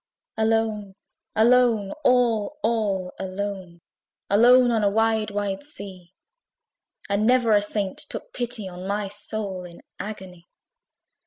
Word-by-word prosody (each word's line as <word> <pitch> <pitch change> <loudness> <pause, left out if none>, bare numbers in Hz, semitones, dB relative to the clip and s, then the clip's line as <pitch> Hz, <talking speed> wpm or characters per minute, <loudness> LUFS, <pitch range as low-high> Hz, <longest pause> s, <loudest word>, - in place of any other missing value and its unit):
Alone, 220 -3 0 0.4
alone, 230 -3 +4
all, 245 0 +2
all 205 -5 0
alone, 190 -2 -5 0.5
Alone 245 +4 +6
on 225 -2 +1
a 200 - +4
wide 220 0 +1
wide 205 0 -2
sea! 190 - -10 0.9
And 200 +2 +1
never 245 -2 +4
a 205 -1 +5
saint 205 -2 -2
took - - -7
pity 240 -4 -3
on 180 0 -8
My 200 0 -2
soul 205 -2 -5
in 175 -1 -12 0.2
agony. 185 -5 -8
210 Hz, 115 wpm, -24 LUFS, 195-225 Hz, 0.9 s, Alone